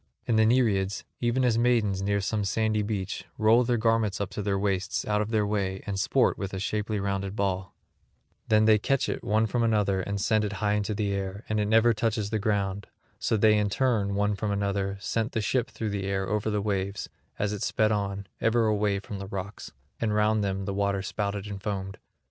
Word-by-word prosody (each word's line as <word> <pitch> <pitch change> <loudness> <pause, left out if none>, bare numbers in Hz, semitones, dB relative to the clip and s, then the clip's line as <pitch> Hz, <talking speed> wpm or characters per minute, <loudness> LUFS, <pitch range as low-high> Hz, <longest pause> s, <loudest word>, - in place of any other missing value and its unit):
And 110 -2 +3
the 110 - +5
Nereids, 105 -5 +2 0.2
even 125 +2 +1
as 115 -2 +2
maidens 115 -5 +2
near 100 +1 +1
some 105 +1 -1
sandy 110 +1 +1
beach 100 -3 -3
roll 110 +3 +5
their 120 0 +1
garments 110 -3 +1
up 100 -2 -3
to - - -4
their 100 -1 0
waists 95 -1 -1
out 105 0 +1
of 105 - -2
their 110 -2 +1
way 95 -2 -2
and 100 -2 -3
sport 125 +6 +2
with 100 -1 -4
a - - -3
shapely 105 +2 -2
rounded 100 0 -2
ball; 95 -2 -2 0.7
then 110 0 +4
they 110 -1 +5
catch 135 +5 +1
it - - -3
one 110 +2 +2
from 120 +3 -1
another 105 -4 +2
and 100 +2 -3
send 110 +2 +2
it 105 -1 -2
high 105 -1 0
into 105 0 -1
the 100 -1 -1
air; 100 +1 -4
and 110 0 +1
it 105 - +1
never 115 +2 +5
touches 110 -1 -1
the 110 - 0
ground; 100 -1 -1 0.3
so 110 - +1
they 105 +1 +5
in 105 -1 +1
turn 105 -4 +1
one 105 +1 +1
from 105 +1 -2
another 100 -1 -1
sent 115 +3 -2
the 110 - 0
ship 125 +4 0
through 110 -4 -4
the 100 -1 -3
air 95 -1 -1
over 105 +2 -1
the 105 -1 -1
waves, 100 -1 -2 0.3
as 100 0 -1
it 105 - -5
sped 110 0 +1
on 100 -1 -2
ever 115 0 +2
away 105 -2 +1
from 100 0 -7
the 95 - -6
rocks; 100 +1 -6 0.3
and 110 -2 0
round 105 0 +2
them 95 -1 -2
the 100 - -2
water 100 -1 0
spouted 100 0 -3
and 100 -2 -6
foamed. 95 -2 -4
105 Hz, 220 wpm, -27 LUFS, 100-110 Hz, 0.7 s, the